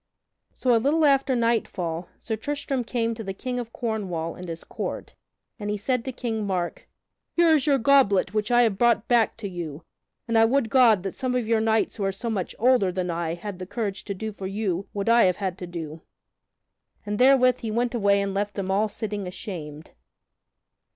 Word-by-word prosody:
So 250 Hz, -2 st, +2 dB
a 225 Hz, -, +3 dB
little 305 Hz, +5 st, +3 dB
after 275 Hz, -2 st, +3 dB
nightfall 185 Hz, -8 st, -1 dB
Sir 225 Hz, -, -4 dB
Tristram 280 Hz, +2 st, -3 dB
came 230 Hz, -1 st, -1 dB
to 225 Hz, 0 st, -7 dB
the 195 Hz, -1 st, -5 dB
King 250 Hz, +3 st, -3 dB
of 235 Hz, -1 st, -6 dB
Cornwall 190 Hz, -10 st, -3 dB
and 180 Hz, -1 st, -9 dB
his 165 Hz, 0 st, -6 dB
court, -, -, -5 dB, 0.5 s
and 205 Hz, -1 st, -4 dB
he 210 Hz, -, -1 dB
said 250 Hz, +3 st, -1 dB
to 260 Hz, -, -3 dB
King 225 Hz, -4 st, -3 dB
Mark: 180 Hz, -3 st, -3 dB, 0.4 s
"Here 340 Hz, -1 st, +4 dB
is 300 Hz, -1 st, +2 dB
your 280 Hz, -2 st, +4 dB
goblet 225 Hz, -8 st, +3 dB
which 215 Hz, +1 st, -1 dB
I 240 Hz, 0 st, +5 dB
have 215 Hz, -5 st, 0 dB
brought 235 Hz, -2 st, +3 dB
back 235 Hz, -3 st, +3 dB
to 220 Hz, -3 st, -5 dB
you; 165 Hz, -4 st, -6 dB, 0.4 s
and 230 Hz, -1 st, +3 dB
I -, -, +7 dB
would 240 Hz, -1 st, +1 dB
God 230 Hz, -8 st, +5 dB
that 195 Hz, -, -3 dB
some 255 Hz, -1 st, -2 dB
of 245 Hz, -3 st, -1 dB
your 225 Hz, -1 st, +2 dB
knights 220 Hz, 0 st, +1 dB
who 205 Hz, -, -3 dB
are 195 Hz, -, +1 dB
so 225 Hz, +5 st, -4 dB
much 190 Hz, -5 st, -3 dB
older 240 Hz, -6 st, +3 dB
than 180 Hz, -1 st, -2 dB
I 165 Hz, -1 st, -2 dB
had 190 Hz, +1 st, -7 dB
the 185 Hz, -, -6 dB
courage 200 Hz, -3 st, -3 dB
to 200 Hz, -, -4 dB
do 220 Hz, +3 st, -4 dB
for 195 Hz, -2 st, -6 dB
you 195 Hz, -2 st, -2 dB
what 200 Hz, 0 st, -4 dB
I 230 Hz, -1 st, +6 dB
have 180 Hz, -1 st, +3 dB
had 190 Hz, -3 st, -2 dB
to 180 Hz, -, -6 dB
do." 165 Hz, -2 st, -7 dB, 1.0 s
And 210 Hz, 0 st, -3 dB
therewith 255 Hz, -1 st, +5 dB
he 225 Hz, -, -4 dB
went 235 Hz, +3 st, 0 dB
away 200 Hz, -3 st, +3 dB
and 200 Hz, -1 st, -3 dB
left 205 Hz, +1 st, -2 dB
them 190 Hz, -1 st, -2 dB
all 205 Hz, +3 st, +2 dB
sitting 205 Hz, -1 st, -4 dB
ashamed. 160 Hz, -6 st, -7 dB
215 Hz, 210 wpm, -25 LUFS, 190-240 Hz, 1.0 s, I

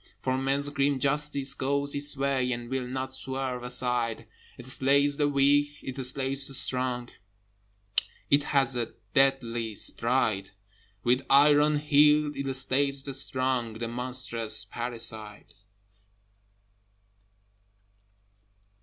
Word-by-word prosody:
For 130 Hz, 0 st, -1 dB
Man's 135 Hz, +2 st, 0 dB
grim 140 Hz, -1 st, 0 dB
Justice 140 Hz, 0 st, +1 dB
goes 140 Hz, +1 st, -1 dB
its 145 Hz, 0 st, 0 dB
way, 135 Hz, -2 st, 0 dB
And 120 Hz, +1 st, -7 dB
will 130 Hz, -2 st, -2 dB
not 130 Hz, +1 st, -5 dB
swerve 130 Hz, -1 st, -5 dB
aside: 125 Hz, -2 st, -2 dB, 0.3 s
It 125 Hz, -, -11 dB
slays 140 Hz, +2 st, +3 dB
the 145 Hz, -, +2 dB
weak, 145 Hz, +1 st, +2 dB
it 130 Hz, 0 st, -6 dB
slays 135 Hz, +1 st, 0 dB
the 135 Hz, -, -1 dB
strong, 125 Hz, -2 st, +2 dB, 1.2 s
It 145 Hz, +1 st, +3 dB
has 135 Hz, -2 st, +1 dB
a 120 Hz, -2 st, -4 dB, 0.2 s
deadly 120 Hz, -5 st, +1 dB
stride: 110 Hz, -4 st, 0 dB, 0.5 s
With 125 Hz, +2 st, +2 dB
iron 145 Hz, +2 st, +5 dB
heel 150 Hz, 0 st, +3 dB
it 135 Hz, 0 st, -3 dB
slays 135 Hz, +1 st, +1 dB
the 135 Hz, -, -5 dB
strong, 130 Hz, -3 st, 0 dB
The 115 Hz, +1 st, -5 dB
monstrous 115 Hz, -3 st, -1 dB
parricide! 110 Hz, -2 st, -5 dB
130 Hz, 110 wpm, -27 LUFS, 125-140 Hz, 1.2 s, iron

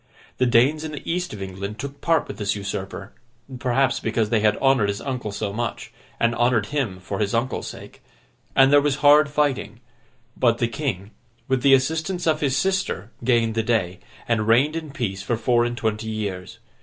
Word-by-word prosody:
The 130 Hz, -, +3 dB
Danes 130 Hz, +6 st, +3 dB
in 155 Hz, -1 st, -5 dB
the 145 Hz, -, -8 dB
East 180 Hz, +1 st, -2 dB
of 100 Hz, -2 st, -6 dB
England 100 Hz, +2 st, -6 dB
took 140 Hz, +3 st, -7 dB
part 165 Hz, -2 st, +2 dB
with -, -, -8 dB
this 100 Hz, -1 st, 0 dB
usurper 100 Hz, 0 st, -6 dB, 0.5 s
(perhaps 130 Hz, 0 st, +1 dB
because 110 Hz, -1 st, -1 dB
they 115 Hz, -, +3 dB
had 105 Hz, 0 st, +2 dB
honoured 135 Hz, -7 st, +3 dB
his 100 Hz, -, -2 dB
uncle 125 Hz, -6 st, -4 dB
so 100 Hz, 0 st, -3 dB
much, 120 Hz, +2 st, -4 dB, 0.3 s
and 115 Hz, 0 st, +2 dB
honoured 120 Hz, -2 st, +2 dB
him 120 Hz, -11 st, -1 dB
for 95 Hz, +2 st, -5 dB
his 105 Hz, +1 st, 0 dB
uncle's 120 Hz, +3 st, -1 dB
sake), -, -, -11 dB, 0.5 s
and 135 Hz, +1 st, +6 dB
there 145 Hz, -, +7 dB
was 145 Hz, -1 st, +1 dB
hard 145 Hz, 0 st, +7 dB
fighting; 145 Hz, -6 st, -1 dB, 0.6 s
but, 115 Hz, -2 st, +2 dB
the 120 Hz, -, +1 dB
King, 115 Hz, -7 st, -4 dB, 0.4 s
with 130 Hz, -2 st, +1 dB
the 135 Hz, +1 st, +7 dB
assistance 160 Hz, +6 st, -1 dB
of 155 Hz, -2 st, +1 dB
his 140 Hz, -2 st, +1 dB
sister, 190 Hz, -9 st, -1 dB
gained 115 Hz, -2 st, +2 dB
the 115 Hz, -, +1 dB
day, 110 Hz, -6 st, -1 dB, 0.3 s
and 110 Hz, -2 st, 0 dB
reigned 135 Hz, +7 st, +4 dB
in 160 Hz, -2 st, -5 dB
peace 115 Hz, -9 st, -3 dB
for 115 Hz, +4 st, -1 dB
four 120 Hz, +1 st, +2 dB
and 120 Hz, 0 st, -3 dB
twenty 110 Hz, 0 st, -2 dB
years. 100 Hz, -4 st, -5 dB
120 Hz, 195 wpm, -23 LUFS, 105-140 Hz, 0.6 s, there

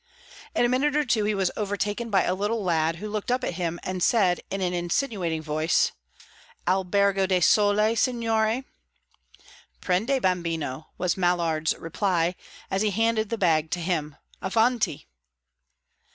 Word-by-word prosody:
In -, -, +3 dB
a -, -, +4 dB
minute 270 Hz, +4 st, +1 dB
or 300 Hz, 0 st, +2 dB
two 220 Hz, -4 st, +1 dB
he 210 Hz, 0 st, +1 dB
was 190 Hz, -2 st, +1 dB
overtaken 205 Hz, +2 st, -2 dB
by 195 Hz, -3 st, +3 dB
a 180 Hz, -, 0 dB
little 205 Hz, +3 st, -1 dB
lad, 165 Hz, -2 st, +1 dB
who 210 Hz, +5 st, -6 dB
looked 210 Hz, +1 st, -4 dB
up 250 Hz, +1 st, +1 dB
at 180 Hz, -, -2 dB
him 170 Hz, -1 st, -3 dB
and 185 Hz, -1 st, -4 dB
said 185 Hz, -4 st, +3 dB
in 195 Hz, -, -3 dB
an 180 Hz, -1 st, -1 dB
insinuating 175 Hz, -, -1 dB
voice, 155 Hz, +2 st, +1 dB, 0.8 s
"Albergo 195 Hz, +1 st, +2 dB
del 185 Hz, -1 st, +2 dB
Sole, 210 Hz, +3 st, +4 dB
signore?" 230 Hz, -1 st, +1 dB, 1.2 s
"Prendi, 220 Hz, +9 st, +1 dB
bambino," 165 Hz, -, -2 dB
was 180 Hz, +1 st, 0 dB
Mallard's 170 Hz, -3 st, +1 dB
reply, 175 Hz, 0 st, 0 dB, 0.4 s
as 195 Hz, -, 0 dB
he 215 Hz, -, +2 dB
handed 220 Hz, +1 st, +1 dB
the 230 Hz, -, -2 dB
bag 160 Hz, -5 st, +2 dB
to 175 Hz, -, -2 dB
him. 160 Hz, -4 st, -2 dB, 0.3 s
"Avanti!" 225 Hz, -, +1 dB
195 Hz, 150 wpm, -25 LUFS, 175-220 Hz, 1.2 s, a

